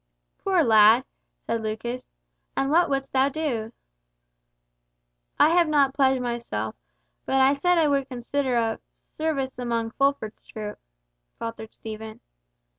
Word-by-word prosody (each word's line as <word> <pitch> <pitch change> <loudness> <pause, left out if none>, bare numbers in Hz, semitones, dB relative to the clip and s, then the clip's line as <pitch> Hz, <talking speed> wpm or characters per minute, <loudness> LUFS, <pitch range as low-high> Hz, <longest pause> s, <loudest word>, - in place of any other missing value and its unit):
"Poor 375 -4 +2
lad!" 220 +2 +6 0.4
said 230 0 -1
Lucas; 230 +3 -4 0.5
"and 270 +1 +1
what 345 +3 +4
wouldst 270 -1 -2
thou 265 +1 +3
do?" 260 -8 -3 1.7
"I - - +7
have 340 0 +4
not 285 -3 +3
pledged 265 -2 +2
myself—but 110 - -5
I 265 +1 +5
said 355 +5 +2
I 320 -2 +4
would 275 -2 0
consider 255 +1 -1
of—service 265 +4 -3
among 230 -2 -2
Fulford's 275 -5 -1
troop," 210 -1 -7 0.6
faltered 230 -1 -6
Stephen. 220 0 -8
255 Hz, 115 wpm, -25 LUFS, 225-280 Hz, 1.7 s, I